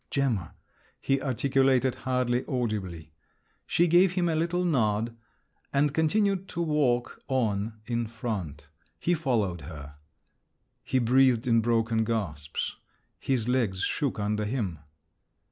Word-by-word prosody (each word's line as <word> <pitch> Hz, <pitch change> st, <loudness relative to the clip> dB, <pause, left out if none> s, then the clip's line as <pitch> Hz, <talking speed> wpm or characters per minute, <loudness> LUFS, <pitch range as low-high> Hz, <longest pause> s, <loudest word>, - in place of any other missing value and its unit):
"Gemma," 120 Hz, -, -1 dB, 0.4 s
he 135 Hz, 0 st, 0 dB
articulated, 130 Hz, -1 st, +2 dB
hardly 125 Hz, -1 st, 0 dB
audibly. 95 Hz, -, -3 dB, 0.5 s
She 175 Hz, -, +3 dB
gave 175 Hz, +2 st, +5 dB
him 180 Hz, -2 st, +1 dB
a 160 Hz, -, +1 dB
little 170 Hz, +3 st, 0 dB
nod, 115 Hz, -7 st, +1 dB, 0.6 s
and 140 Hz, +1 st, +2 dB
continued 195 Hz, +4 st, +1 dB
to 170 Hz, -, -3 dB
walk 140 Hz, -6 st, 0 dB
on 110 Hz, -4 st, -1 dB
in 115 Hz, 0 st, -1 dB
front. 105 Hz, -, -5 dB, 0.3 s
He 175 Hz, -, +1 dB
followed 115 Hz, -, 0 dB
her. 75 Hz, -3 st, -9 dB, 0.9 s
He 130 Hz, -, 0 dB
breathed 125 Hz, 0 st, +4 dB
in 115 Hz, -2 st, +4 dB
broken 115 Hz, -1 st, +1 dB
gasps. 90 Hz, -11 st, -3 dB, 0.4 s
His 125 Hz, -4 st, -1 dB
legs 115 Hz, -7 st, +1 dB
shook 140 Hz, -7 st, -1 dB
under 105 Hz, +1 st, -1 dB
him. 105 Hz, -, -2 dB
120 Hz, 120 wpm, -28 LUFS, 105-140 Hz, 0.9 s, gave